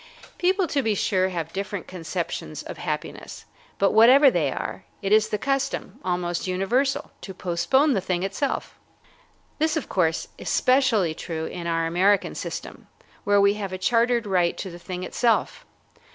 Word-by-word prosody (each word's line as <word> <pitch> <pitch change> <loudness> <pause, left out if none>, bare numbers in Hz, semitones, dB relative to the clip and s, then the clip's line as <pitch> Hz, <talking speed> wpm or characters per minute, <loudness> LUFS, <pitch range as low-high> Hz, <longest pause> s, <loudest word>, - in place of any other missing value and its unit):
People, 370 +1 +2
to 290 -4 0
be 220 -4 0
sure, 185 -1 +1
have 165 -3 -4
different 200 0 -4
conceptions 170 - -5
of - - -8
happiness, - - -5 0.3
but 195 - +3
whatever 255 +6 +7
they - - +1
are, - - -5 0.2
it 195 - -1
is 215 0 +4
the 210 - -1
custom, 275 +4 -2
almost 175 -1 -2
universal, 230 +10 0
to 190 - -8
postpone 185 - +2
the 195 - 0
thing 180 -1 -1
itself. 200 +9 -3 0.8
This, 315 +1 +1
of 310 - -4
course, 165 -4 0
is - - -5
specially 255 - +3
true 160 0 -5
in 170 0 -6
our 165 -1 0
American 190 +5 +2
system, - - -7 0.4
where 205 0 +4
we 200 0 +5
have 195 -2 -4
a - - -3
chartered 235 +4 +2
right 180 -3 +1
to 190 - -5
the 175 - -10
thing 180 +1 -6
itself. 230 +4 0
195 Hz, 165 wpm, -24 LUFS, 180-245 Hz, 0.8 s, whatever